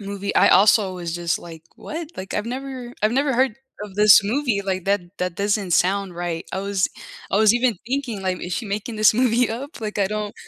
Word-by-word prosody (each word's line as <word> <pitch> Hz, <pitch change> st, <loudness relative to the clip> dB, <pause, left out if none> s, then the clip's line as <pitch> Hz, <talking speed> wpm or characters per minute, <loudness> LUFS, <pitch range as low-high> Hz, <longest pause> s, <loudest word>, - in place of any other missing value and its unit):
movie, 200 Hz, 0 st, -5 dB
I -, -, +5 dB
also 195 Hz, 0 st, +5 dB
was 170 Hz, -2 st, -5 dB
just 170 Hz, -1 st, -1 dB
like 165 Hz, -2 st, -11 dB
"What?" 325 Hz, 0 st, -6 dB
Like 190 Hz, +1 st, -6 dB
I've 210 Hz, +2 st, -2 dB
never 255 Hz, -1 st, -6 dB
I've 215 Hz, +2 st, +3 dB
never 275 Hz, +2 st, +1 dB
heard 260 Hz, -2 st, +2 dB, 0.3 s
of 205 Hz, -2 st, -8 dB
this 210 Hz, -1 st, +7 dB
movie, 235 Hz, -2 st, 0 dB
like, 185 Hz, -2 st, -3 dB
that 200 Hz, 0 st, +2 dB, 0.2 s
that 180 Hz, -1 st, -2 dB
doesn't 200 Hz, -1 st, 0 dB
sound 190 Hz, +1 st, +1 dB
right, 175 Hz, -2 st, -3 dB
I -, -, -2 dB
was 200 Hz, -1 st, 0 dB, 0.4 s
I -, -, +1 dB
was 215 Hz, +1 st, +5 dB
even 240 Hz, -3 st, +1 dB
thinking 245 Hz, -6 st, -3 dB
like, 185 Hz, -1 st, -2 dB
"Is 180 Hz, -, -5 dB
she 225 Hz, -, -3 dB
making 210 Hz, +3 st, -4 dB
this 215 Hz, 0 st, +5 dB
movie 245 Hz, 0 st, +2 dB
up?" 260 Hz, +4 st, -7 dB
Like 210 Hz, -1 st, -4 dB
I 195 Hz, -, +2 dB
don't 210 Hz, 0 st, -4 dB
205 Hz, 220 wpm, -22 LUFS, 190-240 Hz, 0.4 s, this